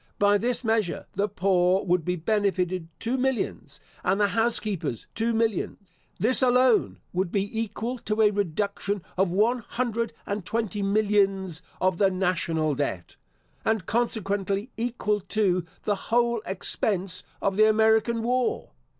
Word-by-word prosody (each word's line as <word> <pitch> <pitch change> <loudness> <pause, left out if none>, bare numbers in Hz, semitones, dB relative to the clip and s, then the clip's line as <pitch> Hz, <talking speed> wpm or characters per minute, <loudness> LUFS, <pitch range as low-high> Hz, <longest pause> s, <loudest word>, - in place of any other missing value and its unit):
By 205 0 +4
this 245 +3 0
measure, 220 -5 0
the 200 +2 0
poor 185 -1 +2
would 180 -2 +2
be 180 +3 -1
benefited 185 -2 0
two 240 +3 -1
millions, 265 -1 -2 0.2
and 190 +2 +1
the 205 -1 +3
house 225 +2 +2
keepers 190 - -4
two 225 +2 0
millions. 225 -3 0 0.4
This 250 +5 +3
alone 250 -2 +3 0.2
would 180 -1 -1
be 205 +3 -1
equal 230 +3 -3
to 220 0 0
a 210 - +5
reduction 200 0 -2
of 190 0 +2
one 220 +7 +2
hundred 235 0 -2
and 200 -1 -3
twenty 210 0 -2
millions 195 -4 +1 0.2
of 185 -1 +1
the 195 -2 +5
National 170 -4 0
Debt, 130 -11 -3 0.5
and 220 -5 0
consequently 205 -1 -1
equal 225 -3 -1
to 185 -3 0 0.2
the 205 - +1 0.2
whole 235 -1 +2
expense 190 -1 0 0.2
of 195 -1 0
the 215 +1 +5
American 220 +1 +3
War. 250 +1 0
205 Hz, 140 wpm, -26 LUFS, 185-225 Hz, 0.5 s, a